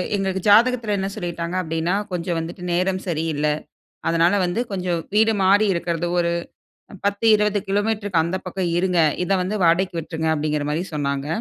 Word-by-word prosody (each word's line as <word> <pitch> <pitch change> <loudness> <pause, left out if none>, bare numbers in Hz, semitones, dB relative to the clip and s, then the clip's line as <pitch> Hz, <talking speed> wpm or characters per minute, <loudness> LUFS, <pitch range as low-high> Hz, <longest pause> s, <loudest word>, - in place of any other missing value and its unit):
எங்களுக்கு 190 -1 -1
ஜாதகத்தில 230 0 +4
என்ன 195 0 -2
சொல்லிட்டாங்க? 170 0 -4
அப்படினா, 165 +2 -1 0.2
கொஞ்சம் 175 -1 -2
வந்துட்டு 170 +2 -7
நேரம் 185 +2 0
சரியில்ல. 160 -3 -1 0.6
அதனால 165 +2 +3
வந்து, 180 +6 -1
கொஞ்ச 185 -2 -3 0.3
வீடு 220 +1 +5
மாறி 200 +3 +4
இருக்குறது, 170 0 -2
ஒரு 170 0 +1 0.7
10, 200 +2 0
20 210 0 +1
கிலோமீட்டருக்கு 205 -4 +1
அந்த 175 +3 -2
பக்கம் 185 -1 -2
இருங்க. 180 -1 +1 0.3
இத 180 - -4
வந்து 200 +4 -2
வாடகைக்கு 170 +1 +2
விட்ருங்க, 160 0 -4
அப்படிங்கிற 150 -1 -1
மாரி 160 +4 -1
சொன்னாங்க. 140 -1 -2
180 Hz, 155 wpm, -22 LUFS, 165-195 Hz, 0.7 s, வீடு